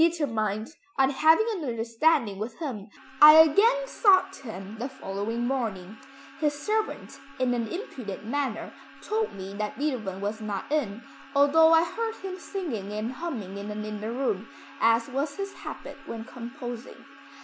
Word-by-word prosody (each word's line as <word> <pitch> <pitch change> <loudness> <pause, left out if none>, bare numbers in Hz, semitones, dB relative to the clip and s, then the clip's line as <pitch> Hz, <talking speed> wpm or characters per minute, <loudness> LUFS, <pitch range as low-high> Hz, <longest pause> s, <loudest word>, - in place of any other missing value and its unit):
Determined 225 -9 0 0.2
on 270 0 +4
having 320 +9 +5
an 375 -7 -3
understanding 230 -1 +1
with 220 +4 -5
him 250 -12 -5 0.3
I 300 +1 +12
again 405 +11 +6
sought 380 -5 +4
him 220 -4 -8
the 250 +4 -3
following 225 -1 -3
morning. 220 -7 -2 0.4
His 295 -2 +1
servant 435 +3 -2 0.2
in 255 -1 +2
an 235 -2 -1
impudent 255 - -6
manner 260 -2 -2 0.3
told 440 +1 -1
me 195 0 -7
that 210 0 -3
Beethoven 240 -10 -2
was 205 +2 -3
not 210 +3 -4
in, 240 -7 -1 0.3
although 310 +3 +6
I 325 0 +7
heard 450 +4 -3
him 375 -1 -7
singing 260 - -4
and 215 +3 -2
humming 245 - -5
in 200 +1 -6
an 210 0 -4
inner 215 +1 -4
room, 230 -5 -1 0.3
as 230 0 +4
was 280 +2 -2
his 395 0 -4
habit - - -8
when 225 -1 -5
composing. 245 0 -8
250 Hz, 150 wpm, -27 LUFS, 215-320 Hz, 0.4 s, I